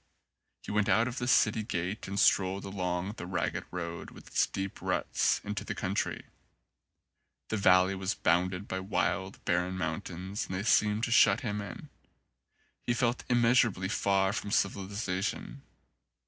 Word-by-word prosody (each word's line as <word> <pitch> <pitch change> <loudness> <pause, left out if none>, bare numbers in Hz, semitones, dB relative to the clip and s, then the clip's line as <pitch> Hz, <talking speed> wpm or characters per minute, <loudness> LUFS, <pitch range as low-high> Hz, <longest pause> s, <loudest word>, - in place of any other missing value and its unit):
He - - -6
went 105 -1 +1
out 115 +2 +4
of 125 +1 -4
the 120 - -2
city 110 -3 +4
gate 95 0 -3
and 100 +1 -2
strolled 95 -1 +3
along 90 -1 -2
the 90 - -6
ragged 90 -2 -2
road, 85 -1 -5
with - - -14
its - - +1
deep 95 0 -5
ruts, - - +1
into 105 0 -4
the - - -5
country. 95 +2 -2 1.2
The 110 - -1
valley 95 -1 +5
was 95 +1 -2
bounded 90 +3 +1
by 95 - -3
wild, 95 0 -2
barren 90 +1 0
mountains 90 +3 -4
and 95 - -4
they 95 - -2
seemed 105 0 +3
to 120 - 0
shut 105 -4 +5
him 105 -4 -2
90 100 -3 -5
in. - - -14 0.9
He 120 - -1
felt 120 -1 0
immeasurably 115 -6 +3
far 95 -2 +2
away - - -2
from 105 - -4
civilisa 100 -1 -1
tion. 140 +5 -4
100 Hz, 160 wpm, -30 LUFS, 95-105 Hz, 1.2 s, valley